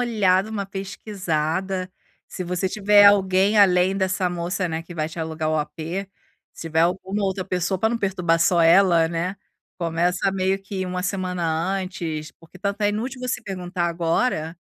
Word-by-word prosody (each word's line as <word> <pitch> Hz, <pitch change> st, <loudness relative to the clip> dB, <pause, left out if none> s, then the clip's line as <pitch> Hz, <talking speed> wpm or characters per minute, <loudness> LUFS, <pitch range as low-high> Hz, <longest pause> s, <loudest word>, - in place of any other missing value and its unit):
olhada, 210 Hz, -4 st, +2 dB
uma 205 Hz, -2 st, -3 dB
pesquisada. 190 Hz, -2 st, -3 dB, 0.4 s
Se 185 Hz, -, -5 dB
você 180 Hz, +2 st, -1 dB
tiver 205 Hz, +1 st, +5 dB
alguém 195 Hz, +1 st, +4 dB
além 185 Hz, -1 st, +4 dB
dessa 185 Hz, -1 st, 0 dB
moça, 175 Hz, +1 st, -2 dB
né, 160 Hz, 0 st, -3 dB
que 170 Hz, +1 st, -11 dB
vai 155 Hz, -1 st, -2 dB
te 160 Hz, -, -10 dB
alugar 160 Hz, -1 st, -2 dB
o 155 Hz, -, +1 dB
apê, 165 Hz, +5 st, -4 dB, 0.5 s
se -, -, -10 dB
tiver 160 Hz, 0 st, +1 dB
alguma 190 Hz, +4 st, -1 dB
outra 190 Hz, -1 st, -2 dB
pessoa, 180 Hz, 0 st, -1 dB
pra 220 Hz, -, +2 dB
não 235 Hz, -, -1 dB
perturbar 180 Hz, -5 st, +1 dB
só 170 Hz, 0 st, +4 dB
ela, 170 Hz, -1 st, +5 dB
né, 175 Hz, +4 st, -3 dB, 0.4 s
começa 175 Hz, +3 st, 0 dB
meio 190 Hz, 0 st, 0 dB
que 190 Hz, -1 st, -4 dB
1 180 Hz, 0 st, -3 dB
semana 185 Hz, -2 st, -2 dB, 0.3 s
antes, 175 Hz, -5 st, -4 dB
porque 165 Hz, -, -18 dB
tanto 200 Hz, +1 st, -3 dB
é 205 Hz, -, +4 dB
inútil 240 Hz, +5 st, -3 dB
você 250 Hz, -1 st, -3 dB
perguntar 180 Hz, -2 st, -4 dB
agora 165 Hz, 0 st, -1 dB
185 Hz, 165 wpm, -23 LUFS, 170-195 Hz, 0.5 s, tiver